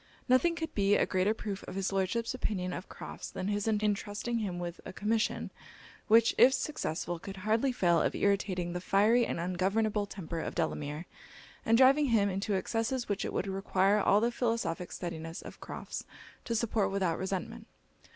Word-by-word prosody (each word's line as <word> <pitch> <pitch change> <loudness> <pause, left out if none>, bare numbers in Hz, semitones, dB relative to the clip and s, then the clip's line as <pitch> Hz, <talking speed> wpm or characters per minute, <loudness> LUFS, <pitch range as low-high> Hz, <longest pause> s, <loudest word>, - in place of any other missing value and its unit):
Nothing 275 +7 +4
could 320 -2 -4
be 200 0 +3
a - - +3
greater 190 +3 +1
proof 200 -3 -5
of - - -7
his 195 0 -1
Lordship's 195 +6 0
opinion 185 -7 -2
of 185 - -7
Crofts - - -8
than 185 - -4
his 205 +1 -1
entrusting 210 +2 0
him 195 -5 -3
with 175 0 -5
a - - -7
commission, 215 +4 -1 0.6
which, 230 0 +5
if 265 - +8
successful, 175 - -3
could 195 +3 -8
hardly 220 +7 +1
fail 175 -9 +3
of - - 0
irritating 190 -3 0
the 180 - -3
fiery 220 +6 +3
and - - -3
ungovernable 200 +4 0
temper 170 -4 -5
of - - -4
Delamere, 150 +3 -2 0.6
and 225 +1 +4
driving 275 +3 +6
him 215 -4 +3
into 195 +2 -1
excesses 230 +5 -1
which 205 -1 -1
it - - -3
would - - -1
require 195 +1 +2
all 205 0 +4
the 235 +2 +1
philosophic 225 -8 -1
steadiness 165 -2 -6
of - - -10
Crofts - - -6 0.4
to 230 - -1
support 220 -2 +1
without 190 -4 0
resentment. 190 -1 -4
200 Hz, 175 wpm, -31 LUFS, 185-225 Hz, 0.6 s, if